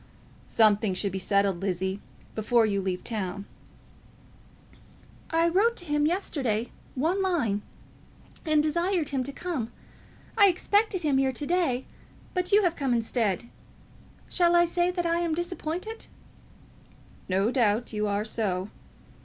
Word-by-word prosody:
"Something 210 Hz, -3 st, +3 dB
should 200 Hz, +1 st, -1 dB
be 190 Hz, -, -3 dB
settled, 195 Hz, -1 st, +1 dB
Lizzie, 190 Hz, +1 st, -2 dB, 0.3 s
before 225 Hz, +1 st, +2 dB
you 200 Hz, -2 st, 0 dB
leave 185 Hz, -1 st, -3 dB
town." 200 Hz, -3 st, -3 dB, 1.8 s
"I 330 Hz, +1 st, +3 dB
wrote 410 Hz, +7 st, +3 dB
to 355 Hz, -, -6 dB
him, 295 Hz, -1 st, +1 dB
yesterday, 260 Hz, -, -1 dB, 0.2 s
one 330 Hz, +9 st, +1 dB
line, 260 Hz, -, 0 dB, 0.8 s
and 310 Hz, -2 st, +3 dB
desired 340 Hz, +1 st, 0 dB
him 270 Hz, -2 st, -1 dB
to 265 Hz, +2 st, -3 dB
come. 280 Hz, -7 st, -4 dB, 0.6 s
I 410 Hz, -3 st, +7 dB
expected 390 Hz, +1 st, +1 dB
him 280 Hz, -3 st, +2 dB
here 265 Hz, -1 st, +2 dB
to 290 Hz, +3 st, -4 dB
day, 310 Hz, -7 st, 0 dB, 0.5 s
but 365 Hz, +1 st, -1 dB
you 410 Hz, +1 st, +5 dB
have 345 Hz, -2 st, +1 dB
come 270 Hz, -5 st, 0 dB
instead. 230 Hz, -2 st, 0 dB, 0.8 s
Shall 345 Hz, -1 st, +3 dB
I 345 Hz, 0 st, +6 dB
say 345 Hz, +1 st, +1 dB
that 355 Hz, -1 st, -2 dB
I 335 Hz, 0 st, +1 dB
am 335 Hz, -2 st, 0 dB
disappointed?" 350 Hz, +5 st, -4 dB, 1.2 s
"No 195 Hz, +5 st, +2 dB
doubt 230 Hz, -2 st, +1 dB
you 210 Hz, 0 st, 0 dB
are 205 Hz, +1 st, -1 dB
so." 200 Hz, -4 st, -1 dB
270 Hz, 135 wpm, -27 LUFS, 210-345 Hz, 1.8 s, I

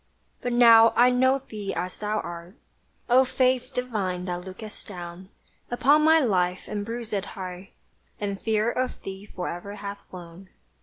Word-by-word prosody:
But 245 Hz, -, -2 dB
now 230 Hz, -2 st, +7 dB
I 245 Hz, +1 st, +6 dB
know 260 Hz, +2 st, +2 dB
thee 205 Hz, -3 st, -5 dB
as 180 Hz, +1 st, -4 dB
thou 215 Hz, 0 st, -1 dB
art, 170 Hz, +3 st, -8 dB, 0.5 s
O 255 Hz, +2 st, +6 dB
Face 255 Hz, -1 st, +1 dB
divine 210 Hz, -9 st, -3 dB
that 180 Hz, -1 st, -3 dB
lookest 205 Hz, +3 st, -8 dB
down 180 Hz, -1 st, -9 dB, 0.4 s
Upon 280 Hz, +5 st, +4 dB
my 320 Hz, +1 st, +6 dB
life 185 Hz, -, +1 dB
and 210 Hz, -1 st, -3 dB
bruiséd 225 Hz, -3 st, -4 dB
heart; 185 Hz, 0 st, -7 dB, 0.5 s
And 200 Hz, -1 st, -3 dB
fear 220 Hz, +1 st, +1 dB
of 255 Hz, +1 st, -2 dB
thee 195 Hz, +1 st, -8 dB
fore'er 180 Hz, +2 st, -6 dB
hath 200 Hz, 0 st, -6 dB
flown! 180 Hz, +1 st, -11 dB
210 Hz, 150 wpm, -26 LUFS, 185-245 Hz, 0.5 s, now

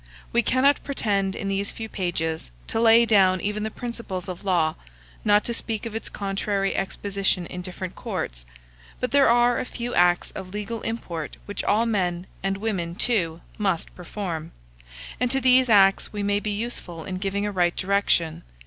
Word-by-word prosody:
We 235 Hz, -, +5 dB
cannot 260 Hz, +5 st, +3 dB
pretend, 200 Hz, -8 st, 0 dB
in 200 Hz, -, -4 dB
these 195 Hz, +1 st, 0 dB
few 225 Hz, -, -6 dB
pages, 165 Hz, -, -2 dB, 0.2 s
to -, -, -2 dB
lay 230 Hz, +1 st, +7 dB
down 190 Hz, -4 st, +4 dB
even 210 Hz, +3 st, -2 dB
the 220 Hz, -, -1 dB
principles 230 Hz, -5 st, -5 dB
of 180 Hz, 0 st, -6 dB
law, 170 Hz, -5 st, +2 dB, 0.5 s
not 205 Hz, 0 st, +4 dB
to 235 Hz, -, -3 dB
speak 225 Hz, -1 st, -2 dB
of 230 Hz, -, -5 dB
its 225 Hz, -, -3 dB
contrary 195 Hz, 0 st, -1 dB
exposition 195 Hz, -1 st, -1 dB
in 180 Hz, +1 st, -6 dB
different 185 Hz, 0 st, -5 dB
courts; -, -, -4 dB, 0.6 s
but 250 Hz, -, -1 dB
there 280 Hz, -2 st, +5 dB
are 240 Hz, +1 st, +4 dB
a -, -, -1 dB
few 245 Hz, -1 st, -5 dB
acts 175 Hz, 0 st, +3 dB
of 185 Hz, -, -7 dB
legal 210 Hz, +2 st, -4 dB
import 175 Hz, -9 st, -4 dB
which 205 Hz, -, -4 dB
all 220 Hz, +3 st, +3 dB
men 180 Hz, -5 st, 0 dB, 0.2 s
and 195 Hz, +1 st, -1 dB
women 190 Hz, -5 st, -2 dB
too 175 Hz, -8 st, 0 dB, 0.2 s
must 190 Hz, -5 st, 0 dB
perform; 170 Hz, -3 st, -5 dB, 0.7 s
and 250 Hz, -, +1 dB
to 270 Hz, +2 st, +2 dB
these 255 Hz, -1 st, +5 dB
acts 195 Hz, -2 st, +5 dB
we 205 Hz, -1 st, -3 dB
may 205 Hz, 0 st, +2 dB
be 210 Hz, -, -3 dB
useful 205 Hz, -6 st, -3 dB
in 185 Hz, -1 st, -4 dB
giving 200 Hz, +1 st, -1 dB
a 205 Hz, -, -1 dB
right 175 Hz, -3 st, +2 dB
direction. 180 Hz, -4 st, +1 dB
200 Hz, 175 wpm, -25 LUFS, 180-225 Hz, 0.7 s, lay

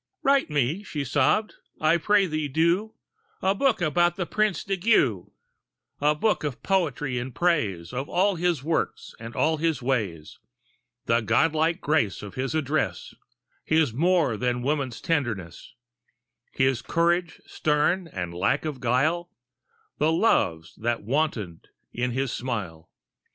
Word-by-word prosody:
"Write 275 Hz, -5 st, +3 dB
me," 150 Hz, +5 st, 0 dB
she 150 Hz, -8 st, -4 dB
sobbed 145 Hz, -, +2 dB, 0.3 s
"I 155 Hz, +2 st, +3 dB
pray 205 Hz, +4 st, +3 dB
thee 155 Hz, -3 st, -2 dB
do 170 Hz, +9 st, +1 dB, 0.4 s
A 190 Hz, -, +2 dB
book 230 Hz, 0 st, +1 dB
about 175 Hz, +1 st, +2 dB
the 180 Hz, -, -2 dB
Prince 215 Hz, +1 st, 0 dB
di 195 Hz, -, -1 dB
Giu 170 Hz, -, +2 dB, 0.7 s
A 150 Hz, +1 st, +3 dB
book 210 Hz, +5 st, +1 dB
of 145 Hz, -4 st, -4 dB
poetry 150 Hz, -9 st, 0 dB
in 125 Hz, +2 st, -5 dB
praise 110 Hz, -, 0 dB
Of 135 Hz, +3 st, -4 dB
all 195 Hz, +3 st, +2 dB
his 170 Hz, -5 st, 0 dB
works 160 Hz, +2 st, -2 dB
and 115 Hz, +1 st, -9 dB
all 160 Hz, +1 st, +2 dB
his 160 Hz, -3 st, 0 dB
ways; 105 Hz, -, -3 dB, 0.7 s
The 115 Hz, +1 st, +2 dB
godlike 160 Hz, -, +2 dB
grace 145 Hz, -12 st, 0 dB
of 100 Hz, -, -8 dB
his 135 Hz, +4 st, -3 dB
address, 140 Hz, -, -1 dB, 0.5 s
His 155 Hz, -6 st, +2 dB
more 165 Hz, -4 st, +2 dB
than 125 Hz, +1 st, -1 dB
woman's 140 Hz, -3 st, -2 dB
tenderness, 120 Hz, -, -3 dB, 0.8 s
His 130 Hz, -2 st, +1 dB
courage 170 Hz, 0 st, 0 dB
stern 155 Hz, +4 st, 0 dB
and 90 Hz, -, -5 dB
lack 95 Hz, -, 0 dB
of 150 Hz, -4 st, -4 dB
guile, 155 Hz, +9 st, +1 dB, 0.7 s
The 155 Hz, +2 st, +3 dB
loves 85 Hz, -, +1 dB
that 115 Hz, 0 st, -2 dB
wantoned 115 Hz, -, -2 dB, 0.3 s
in 125 Hz, +1 st, -1 dB
his 130 Hz, +1 st, -1 dB
smile. 100 Hz, -11 st, -5 dB
150 Hz, 140 wpm, -25 LUFS, 120-170 Hz, 0.8 s, Write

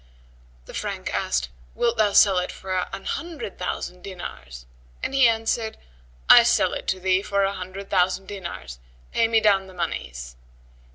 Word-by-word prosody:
The -, -, -12 dB
Frank -, -, -4 dB
asked, 60 Hz, -1 st, 0 dB, 0.3 s
"Wilt 235 Hz, -1 st, +1 dB
thou 215 Hz, -2 st, +3 dB
sell 195 Hz, -3 st, +6 dB
it 180 Hz, -, -3 dB
for 185 Hz, -1 st, -3 dB
an 195 Hz, -, -7 dB
hundred 330 Hz, -, -5 dB
thousand 180 Hz, 0 st, -4 dB
dinars?", 65 Hz, -, -8 dB, 0.4 s
and -, -, -2 dB
he 270 Hz, -3 st, +6 dB
answered, 225 Hz, 0 st, 0 dB, 0.5 s
"I -, -, +10 dB
sell -, -, +3 dB
it -, -, -5 dB
to 190 Hz, -, 0 dB
thee 185 Hz, 0 st, +2 dB
for 200 Hz, -1 st, 0 dB
a 195 Hz, 0 st, +1 dB
hundred 190 Hz, +1 st, -8 dB
thousand 185 Hz, 0 st, +2 dB
dinars; 170 Hz, -, -7 dB, 0.3 s
pay 230 Hz, -, +3 dB
me 225 Hz, 0 st, +4 dB
down 200 Hz, -3 st, +3 dB
the 185 Hz, -, -14 dB
monies." 60 Hz, -, -5 dB
190 Hz, 165 wpm, -24 LUFS, 180-210 Hz, 0.5 s, I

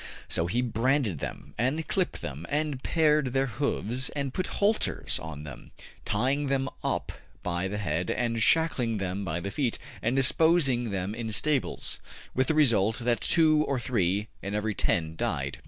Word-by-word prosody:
'' -, -, -16 dB
So 85 Hz, -, +1 dB
he 120 Hz, +7 st, +1 dB
branded 120 Hz, -, +1 dB
them, -, -, -6 dB
and 140 Hz, +7 st, 0 dB
clipped 185 Hz, -2 st, -1 dB
them, 75 Hz, +4 st, -5 dB
and 145 Hz, -2 st, -1 dB
pared 150 Hz, -5 st, +2 dB
their 135 Hz, 0 st, +2 dB
hoofs, 125 Hz, 0 st, -1 dB
and 140 Hz, -2 st, -2 dB
put 185 Hz, -, -1 dB
halters 210 Hz, +2 st, +1 dB
on 75 Hz, -2 st, -7 dB
them, 65 Hz, -5 st, -10 dB, 0.4 s
tying 130 Hz, +7 st, +1 dB
them 135 Hz, 0 st, 0 dB
up -, -, -1 dB, 0.3 s
by 90 Hz, +1 st, -1 dB
the 105 Hz, +2 st, -3 dB
head 85 Hz, -3 st, -1 dB
and 115 Hz, -2 st, 0 dB
shackling 125 Hz, -6 st, +3 dB
them 95 Hz, 0 st, -2 dB
by 85 Hz, -2 st, -2 dB
the 100 Hz, +3 st, -4 dB
feet, 125 Hz, +1 st, -1 dB, 0.2 s
and 120 Hz, +3 st, +1 dB
disposing 135 Hz, -3 st, +3 dB
them 95 Hz, 0 st, -2 dB
in 115 Hz, -1 st, -4 dB
stables, 145 Hz, +5 st, -1 dB, 0.3 s
with 130 Hz, 0 st, +1 dB
the 160 Hz, -, +1 dB
result 115 Hz, -8 st, +4 dB
that 120 Hz, 0 st, 0 dB
two 155 Hz, -2 st, +4 dB
or 135 Hz, -2 st, 0 dB
three 105 Hz, -4 st, 0 dB
in 100 Hz, +1 st, -3 dB
every 105 Hz, 0 st, 0 dB
ten 80 Hz, -4 st, 0 dB
died. -, -, -2 dB
120 Hz, 170 wpm, -28 LUFS, 100-140 Hz, 0.4 s, result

